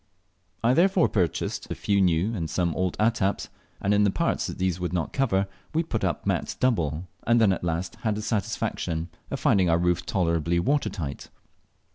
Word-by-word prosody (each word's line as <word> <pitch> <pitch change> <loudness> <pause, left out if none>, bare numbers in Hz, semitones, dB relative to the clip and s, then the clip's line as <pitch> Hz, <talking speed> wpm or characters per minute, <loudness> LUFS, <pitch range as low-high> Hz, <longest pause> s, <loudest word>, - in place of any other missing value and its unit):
I 120 +2 +4
therefore 185 +3 +4
purchased 90 -7 -1
a - - -3
few 100 -1 +1
new 90 +4 +2
and 85 -7 -3
some 85 +2 0
old 95 +1 -1
attaps, 105 -3 +1 0.3
and 100 - +1
in 105 0 +4
the 100 - +4
parts - - 0
these 90 -1 -1
would 90 0 -3
not 85 -3 -2
cover 105 -8 +2 0.3
we 165 - +3
put 165 - -3
the - - 0
mats - - -1
double, 85 - 0 0.2
and 120 0 +5
then 105 -4 +5
at - - -5
last 85 +1 -2
had 110 -2 -1
the 105 - -4
satisfaction 90 -5 -2 0.2
of 140 - -3
finding 100 - +3
our 85 - +4
roof 90 0 +1
tolerably 85 -2 0
water 140 +10 +1
tight. 75 -8 -6
95 Hz, 185 wpm, -26 LUFS, 85-110 Hz, 0.3 s, and